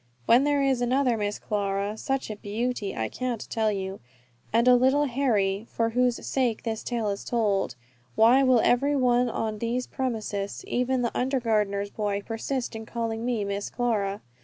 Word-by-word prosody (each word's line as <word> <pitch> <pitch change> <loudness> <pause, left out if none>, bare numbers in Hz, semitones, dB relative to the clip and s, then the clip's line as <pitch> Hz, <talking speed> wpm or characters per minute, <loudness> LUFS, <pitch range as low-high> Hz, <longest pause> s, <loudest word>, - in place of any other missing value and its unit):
When 250 +4 +5
there 290 -1 +2
is 265 -3 +1
another 250 0 +2
Miss 205 -1 -2
Clara 200 0 -2
such 270 +1 -2
a - - -4
beauty! 210 0 -3
I 110 0 -1
can't 245 - -4
tell 220 -1 +1
you 195 -1 -4 0.5
and 230 +2 +3
a 250 - +8
little 265 +4 +3
Harry, 225 -6 0
for 230 0 0
whose 250 0 +1
sake 245 -5 0
this 225 -1 -3
tale 230 -4 -1
is 200 0 -3
told 205 - 0 0.4
why 240 +5 +6
will 255 -3 +4
every 280 +4 +3
one 250 -2 +3
on 220 -2 -3
these 240 +2 -1
premises, 215 -6 -3
even 250 0 0
the 235 - -2
under 265 +1 +1
gardener's 205 -3 0
boy, 205 -1 -2
persist 240 +2 -3
in 220 0 -7
calling 230 -1 -3
me 240 -3 0
"Miss 200 0 -3
Clara?" 210 -5 -1
230 Hz, 175 wpm, -26 LUFS, 205-250 Hz, 0.5 s, a